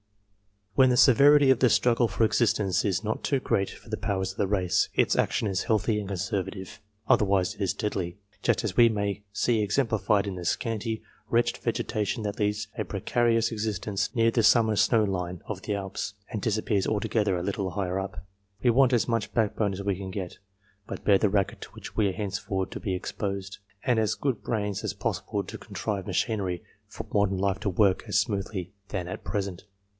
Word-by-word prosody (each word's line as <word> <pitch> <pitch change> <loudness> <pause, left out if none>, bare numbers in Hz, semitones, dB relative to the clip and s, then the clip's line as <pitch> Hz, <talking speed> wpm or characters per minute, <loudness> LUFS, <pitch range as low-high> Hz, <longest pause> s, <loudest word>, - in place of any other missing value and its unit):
When 130 +4 +5
the 125 - +2
severity 140 +2 +7
of 130 - +3
the 125 - +5
struggle 120 0 +3
for 110 +2 0
existence 105 -4 +2
is 95 -1 0
not 110 0 -2
too 140 - +1
great 100 -6 0
for - - -13
the - - -2
powers 95 -1 -1
of 95 - -16
the 100 - +2
race, 95 -3 +1
its - - +3
action 110 - +1
is 95 -2 -1
healthy 105 0 +1
and 100 - -5
conservative, 95 0 -4 0.3
otherwise 95 -3 +3
it - - -12
is 95 - +1
deadly, 95 -4 -3 0.2
just - - +1
as 105 -4 -2
we 120 -1 +7
may 100 -2 -2
see 110 +2 +1
exemplified 105 -2 +1
in 100 -2 -4
the 90 -1 -6
scanty, 110 +3 -2 0.3
wretched 120 +2 +2
vegetation 110 +2 -2
that 105 0 -4
leads 105 0 0
a - - -1
precarious 115 -1 +1
existence 105 -1 -2
near 115 -1 +4
the 115 - +2
summer 110 -1 +4
snow 110 +2 +4
line 90 -3 -3
of 100 -3 -5
the 105 - -1
Alps, 100 +1 -4 0.2
and 105 - -3
disappears 105 -2 0
altogether 105 -2 +1
a 85 - -3
little 95 -1 -2
higher 95 0 -2
up. 95 -2 -6 0.4
We 120 - +5
want 130 +1 +4
as 120 - +2
much 115 -3 -1
backbone 105 -2 +1
as 95 +1 -5
we 100 -2 0
can 95 -1 -6
get, 95 -2 -6 0.5
to - - -4
bear 100 -2 +4
the 105 - +3
racket 100 -1 0
to - - -8
which - - -10
we 105 - +3
are 95 - -1
henceforth 95 -1 -3
to - - -5
be 95 -5 -2
exposed, 100 +1 -4 0.2
and 120 -3 +2
as 110 -1 +1
good 135 -4 -1
brains 105 -4 -2
as - - -2
possible - - -2
to - - -8
contrive 100 -1 -4
machinery, 95 -2 -1 0.2
for - - -8
modern 100 -2 +2
life 100 0 0
to 105 - -1
work 95 0 +2
more 105 - -9
smoothly 100 -3 -1 0.2
than 90 -3 -3
at 90 - -6
present. 100 -3 -3
105 Hz, 200 wpm, -27 LUFS, 95-110 Hz, 0.5 s, severity